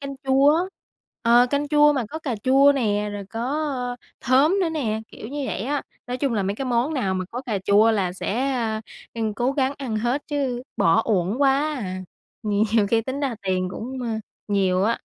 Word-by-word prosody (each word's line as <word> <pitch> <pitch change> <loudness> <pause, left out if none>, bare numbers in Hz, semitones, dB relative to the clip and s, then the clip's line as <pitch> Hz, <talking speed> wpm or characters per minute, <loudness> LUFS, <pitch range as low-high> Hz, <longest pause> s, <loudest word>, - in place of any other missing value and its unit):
canh 275 -1 -6
chua 270 +2 +5
á. 340 - +2 0.6
Ờ, 240 +1 +5
canh 285 0 0
chua 295 0 +5
mà 265 -4 -1
có 315 - -5
cà 285 -6 -3
chua 270 +6 +5
nè, 210 -5 0
rồi 205 -1 -5
có 265 +7 -2 0.5
khóm 285 +9 +3
nữa 360 - +2
nè, 240 -9 -2
kiểu 215 - -9
như 285 +2 -4
vậy 190 - -3
á. 285 +4 -1 0.2
Nói 245 0 -3
chung 270 0 0
là 210 -3 0
mấy 195 +1 -1
cái 270 - -3
món 250 +4 0
nào 200 -9 0
mà 185 0 -2
có 245 +2 -5
cà 220 -7 -2
chua 205 +4 +4
là 195 -5 0
sẽ, 190 +2 -3 0.2
a, 225 -4 -1 0.3
ăn 220 -2 -2
cố 245 +4 0
gắng 275 -1 0
ăn 250 -6 -3
hết 240 +6 0
chứ 270 -5 -2
bỏ 165 0 +4
uổng 195 -2 +1
quá 280 +3 +3
à. 185 -6 -4 0.4
Nhiều 215 0 +2
khi 230 - +4
tính 265 +4 -4
ra 270 -4 -1
tiền 185 -1 0
cũng, 255 +7 -6
ơ, 240 - -3 0.4
nhiều 190 -2 +2
á. 230 +2 +2
240 Hz, 210 wpm, -23 LUFS, 210-275 Hz, 0.6 s, chua